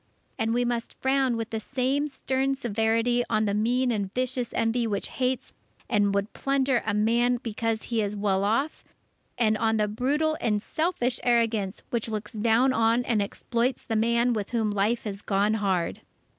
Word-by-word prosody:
And 225 0 +1
we 245 +1 +1
must 240 -1 -3
frown 265 -2 +2
with 225 0 -4
the 220 - -2
same 265 +5 -1
stern 270 -1 -1
severity 230 0 +1
on 215 - +2
the 200 - 0
mean 245 +4 +1
and 200 -4 -2
vicious 255 -1 -1
envy 230 +1 +1
which 205 -2 -2
hates 255 -1 -2 0.3
and 205 -2 +2
would 200 +1 -1
plunder 270 -2 +1
a 215 - +1
man 235 +3 +2
because 225 -1 -2
he 230 -2 -1
is 205 0 -2
well 200 -1 +1
off, 230 +9 0 0.5
and 220 -3 +3
on 225 0 +2
the 210 -1 +2
brutal 290 +9 0
and 210 -2 +1
selfish 260 - -1
arrogance, 225 -5 +1
which 235 -1 -1
looks 215 -1 -4
down 230 +4 +3
on 230 +1 +2
and 220 -3 +1
exploits 235 +5 -1
the 225 - -3
man 235 +2 +2
with 210 -3 -3
whom 225 -3 0
life 205 +4 0
has 200 -2 -5
gone 205 +2 +1
hard. 190 -5 -1
230 Hz, 175 wpm, -26 LUFS, 215-250 Hz, 0.5 s, and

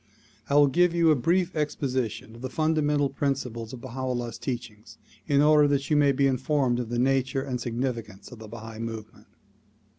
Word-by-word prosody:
I 140 - +1
will 145 0 +7
give 170 +5 +2
you 165 -2 +4
a - - +5
brief 175 +7 +1
exposition 130 -7 -2
of 115 - -12
the 130 - -4
fundamental 150 -1 +1
principles 130 -5 -3
of 125 - -9
Baha 130 0 -8
'Ullah 120 -2 -2
's - - -9
teachings 115 -4 -6 0.3
in 140 0 +4
order 150 -1 +6
that 140 0 -1
you - - +4
may 145 -1 +4
be 140 +1 +2
informed 130 -1 +1
of 120 -2 -4
the 120 - -2
nature 130 +1 +1
and 130 -3 -4
significance 115 -4 -4
of 125 - -11
the 110 -1 -10
Bahai 110 0 -9
movement. 110 -1 -7
130 Hz, 190 wpm, -26 LUFS, 115-145 Hz, 0.3 s, will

